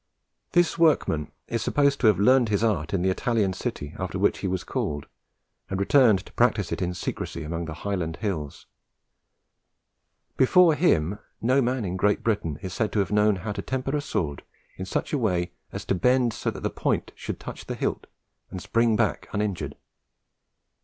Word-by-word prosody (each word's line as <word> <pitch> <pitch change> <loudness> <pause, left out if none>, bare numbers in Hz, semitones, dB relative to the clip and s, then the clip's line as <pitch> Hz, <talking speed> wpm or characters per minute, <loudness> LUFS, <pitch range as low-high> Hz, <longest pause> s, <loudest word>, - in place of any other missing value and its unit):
This 175 -1 +3
workman 115 - +2 0.2
is 115 -1 -2
supposed 140 -1 +2
to 115 - +4
have 105 - +5
learnt 125 +3 +4
his 105 +1 +1
art 85 -9 0
in 95 -3 0
the 95 - +3
Italian 105 -2 0
city 75 -4 -5
after 95 -1 -3
which 100 +2 +2
he 100 - -2
was 95 -1 -2
called, 75 -1 -3 0.6
and 95 - -2
returned 110 -2 +4
to - - -15
practise - - +2
it - - -2
in 90 0 -1
secrecy 85 - -4
among 85 +2 -3
the 80 -1 -6
Highland 90 -5 -1
hills. 80 -10 -4 1.7
Before 170 +5 +6
him, 105 - +2 0.2
no 130 +4 +3
man 125 -2 0
in 90 0 -3
Great 105 +2 +1
Britain 100 -10 -1
is 95 -2 -5
said 110 0 -1
to 105 - +1
have 95 -1 0
known 105 0 +4
how 95 +3 -4
to 100 -1 -4
temper 130 +5 -2
a 145 - 0
sword 80 - -2 0.3
in 95 - -5
such - - -2
a 145 - +2
way 90 -7 0 0.2
as - - -6
to - - +1
bend 125 +4 +2
so - - -2
that - - -7
the - - 0
point - - -1
should - - -6
touch - - -8
the - - -3
hilt - - -2 0.4
and 95 - -6
spring 115 +4 +2
back 105 -8 0
uninjured. 100 -2 -2
105 Hz, 185 wpm, -26 LUFS, 90-120 Hz, 1.7 s, Before